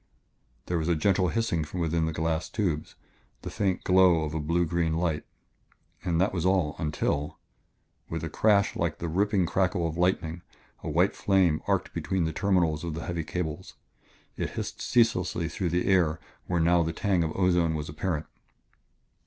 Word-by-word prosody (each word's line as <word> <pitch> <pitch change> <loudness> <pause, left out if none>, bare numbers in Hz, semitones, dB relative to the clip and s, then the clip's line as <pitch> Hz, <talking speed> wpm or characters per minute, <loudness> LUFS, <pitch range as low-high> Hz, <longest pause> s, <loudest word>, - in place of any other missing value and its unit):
There 85 -1 -1
was 80 - -2
a 85 - +3
gentle 95 +3 +2
hissing 115 -7 0
from 75 +4 -6
within 80 -1 0
glass 80 +1 -1
tubes, 90 -9 -2 0.5
the - - -5
faint 95 -3 -1
glow 90 -3 +5
of 75 -1 -4
a 80 - -1
blue 85 +4 +1
green 85 -1 0
light. 85 -3 -1 0.8
And 85 -2 0
that 95 +2 +2
was 85 -4 -1
all, 90 -5 +2
until 75 -2 -1 0.7
with 80 -1 -4
a - - -2
crash 100 +3 +2
like 85 -3 -1
the 85 - -4
ripping 95 +2 +1
crackle 90 -1 +1
of 80 +1 -5
lightning, 85 -2 0 0.4
a - - -5
white 85 +6 +2
flame 95 -6 +2
arced - - 0
between 95 -2 -1
the 80 - -2
terminals 85 -3 +1
of 85 -2 -4
the 80 - -5
heavy 85 -2 -3
cables. 85 +1 -5 0.6
It - - -2
hissed - - -5
ceaselessly 90 -8 +2
through 90 +1 -2
the 90 +2 0
air 90 -5 +3 0.3
where 90 -1 0
now 85 +1 +4
the 80 0 -1
tang 95 -1 +1
of 80 - -2
ozone 90 -4 +2
was 75 0 -4
apparent. 80 +1 -3
85 Hz, 175 wpm, -27 LUFS, 80-95 Hz, 0.8 s, glow